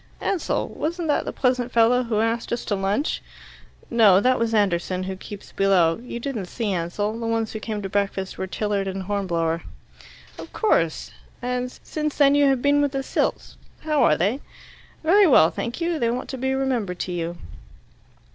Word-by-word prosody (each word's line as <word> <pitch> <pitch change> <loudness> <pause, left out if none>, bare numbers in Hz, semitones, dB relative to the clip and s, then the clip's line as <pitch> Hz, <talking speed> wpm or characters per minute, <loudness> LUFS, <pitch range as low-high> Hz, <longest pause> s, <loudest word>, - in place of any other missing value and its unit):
"Ansell? 380 -4 -1
Wasn't 335 +2 -3
that 290 - +1
the - - -3
pleasant 250 -2 0
fellow 235 +2 +4
who 225 -3 0
asked 230 +1 -1
us 235 - -2
to - - -1
lunch?" 200 +9 -1 0.7
"No. 215 -5 +6
That 255 +4 +2
was 230 -1 0
Anderson, 185 -3 +1
who 190 0 -4
keeps 200 +1 -10
below. 185 -4 +3
You 240 -1 -6
didn't 235 -7 -4
see 215 0 -2
Ansell. 205 +6 -2
The 230 - -3
ones 225 -1 -1
who 220 - -4
came 215 -1 -4
to - - -2
breakfast 195 -1 -2
were 190 - -4
Tilliard 200 0 -2
and 190 0 -4
Hornblower." 170 -4 -1 0.8
"Of - - -9
course. 165 - +1 0.3
And 250 0 -2
since 305 -1 -3
then 280 -1 +5
you 285 0 +4
have 270 -3 +1
been 285 0 +4
with 285 -1 0
the 270 0 -2
Silts. - - -2 0.2
How 305 -2 +1
are 150 - +4
they?" 205 +10 0 0.6
"Very 385 +5 +5
well, 170 - +6
thank 235 +5 -4
you. 335 -1 -1
They 235 - +1
want 245 +2 -3
to 265 - -5
be 265 +1 0
remembered 245 -9 -1
to 185 - -3
you." 170 0 -3
225 Hz, 185 wpm, -23 LUFS, 195-265 Hz, 0.8 s, No